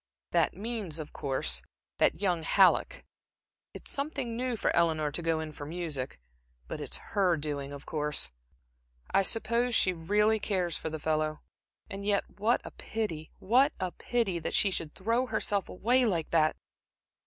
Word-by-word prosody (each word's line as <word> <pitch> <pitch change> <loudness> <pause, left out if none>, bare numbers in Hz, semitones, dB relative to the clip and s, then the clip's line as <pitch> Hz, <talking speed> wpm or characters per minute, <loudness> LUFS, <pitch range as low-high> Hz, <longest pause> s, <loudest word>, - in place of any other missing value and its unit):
"That - - +2
means, 210 -6 -2
of 155 -2 -5
course, 100 - 0 0.4
that - - +3
young 180 -4 +1
Halleck. - - +3 0.7
It's - - -6
something 280 -5 -2
new 250 0 -1
for 220 - 0
Eleanor 160 -3 +2
to 165 - -1
go 165 -1 +1
in 160 -1 -5
for 145 - -8
music. 150 - -3 0.5
But - - -5
it's - - -2 0.2
her 185 -4 +3
doing, 145 -2 -4
of 140 0 -9
course. 150 - -1 0.8
I - - +5
suppose 235 +4 +2
she 185 - +4
really 210 +6 +2
cares 185 -5 0
for 160 - -3
the 160 - -4
fellow. 155 0 -1 0.5
And 195 0 -6
yet 200 -1 +1
what 225 +4 +3
a - - -8
pity 170 -9 -4
what 260 +8 +3
a 185 -1 -1
pity 220 -7 -1
that - - -3
she 200 - +4
should 165 -4 -4
throw 230 +6 0
herself 200 -5 0
away 245 +6 +3
like 170 -6 -1
that!" 155 -2 +3
180 Hz, 165 wpm, -30 LUFS, 155-220 Hz, 0.8 s, I